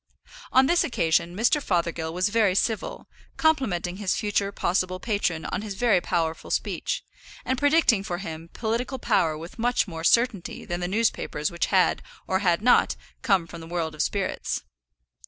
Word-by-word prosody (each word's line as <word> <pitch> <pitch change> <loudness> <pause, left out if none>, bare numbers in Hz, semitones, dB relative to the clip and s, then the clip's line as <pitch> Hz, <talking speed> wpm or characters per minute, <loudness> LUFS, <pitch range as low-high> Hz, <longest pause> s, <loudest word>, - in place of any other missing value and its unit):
On 260 +1 +6
this 345 +5 +3
occasion 170 -5 +1
Mr. 240 +8 +2
Fothergill 170 -5 -1
was 180 +4 0
very 210 -3 +2
civil, 220 +2 -1 0.3
complimenting 200 - +1
his 200 -3 0
future 205 -2 0
possible 185 -1 -1
patron 190 -7 -1
on - - -2
his 210 -2 -6
very 210 -4 +3
powerful 165 -3 -2
speech, - - -2 0.4
and 260 - +1
predicting 285 -7 +3
for 175 -3 -3
him 165 -3 -7
political 240 +4 -2
power 160 -9 +1
with 165 +7 -10
much 245 0 +1
more 165 -3 -6
certainty 230 0 +1
than 175 0 -3
the 175 - -2
newspapers 195 -7 0
which 170 - -1
had, 185 -2 +3 0.2
or 190 - 0
had 180 0 +1
not, 245 - +4 0.3
come 195 -8 +2
from 170 0 -10
the 165 - -9
world 165 -2 -2
of 155 - -3
spirits. 200 -2 -2
190 Hz, 165 wpm, -25 LUFS, 170-230 Hz, 0.4 s, On